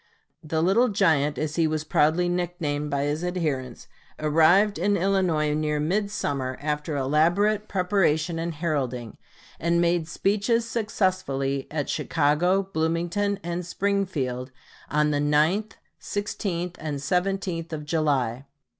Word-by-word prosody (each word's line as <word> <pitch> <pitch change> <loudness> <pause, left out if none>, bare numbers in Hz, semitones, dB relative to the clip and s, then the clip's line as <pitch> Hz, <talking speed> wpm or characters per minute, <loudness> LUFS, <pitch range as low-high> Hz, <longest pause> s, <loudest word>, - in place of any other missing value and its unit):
The 160 +1 -1
"Little 210 +8 +4
Giant," 160 -8 +2
as 155 +1 -3
he 165 -1 +3
was 155 0 -1
proudly 160 +3 +2
nicknamed 170 -5 -2
by 140 -1 0
his 150 +3 -1
adherents, 150 -9 -3 0.3
arrived 165 +7 +4
in 205 0 +2
Illinois 175 -5 +1
near 150 0 0
midsummer, 150 -7 -1
after 150 0 -2
elaborate 175 +10 +2
preparation 180 -4 +1
and 165 0 -3
heralding, 130 -8 -3 0.4
and 170 +1 +1
made 170 -1 +1
speeches 210 +6 +1
successively 185 - -1
at 150 -2 -2
Chicago, 170 +5 +1
Bloomington, 175 +3 -1
and 175 +1 -3
Springfield 175 -10 -1 0.4
on 150 0 +2
the 145 - +1
9th, 155 +9 +2 0.3
16th, 180 -4 -3
and 150 -2 -3
17th 180 +2 -1
of 150 -2 -5
July. 140 -5 0
165 Hz, 120 wpm, -25 LUFS, 150-185 Hz, 0.4 s, Little